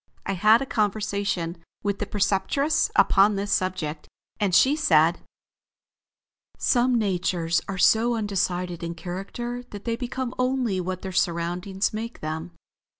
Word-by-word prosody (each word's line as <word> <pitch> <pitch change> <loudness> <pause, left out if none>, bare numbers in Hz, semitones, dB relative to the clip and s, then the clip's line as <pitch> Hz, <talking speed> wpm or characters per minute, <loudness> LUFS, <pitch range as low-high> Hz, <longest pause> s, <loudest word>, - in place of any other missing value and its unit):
I 195 - -1
had 215 +7 +5
a - - -5
conversation 200 -6 -1 0.2
with 200 -1 -1
the 210 - -3
Preceptress 205 +10 +1
upon 200 +1 +5
this 200 +1 -3
subject, 170 -5 -2 0.3
and 200 -4 +1
she 270 +8 +5
said: 165 - +3 1.4
"Some 250 0 +2
natures 180 -5 0
are 195 - -4
so 230 +5 +4
undecided 180 -4 -2
in 170 0 -4
character 195 +8 -5
that 205 -1 -9
they 230 -1 0
become 250 +1 -4
only 255 -7 0
what 185 0 -4
their 190 - -4
surroundings 180 +3 -1
make 230 +2 -5
them. 160 +2 -4
195 Hz, 135 wpm, -25 LUFS, 175-230 Hz, 1.4 s, had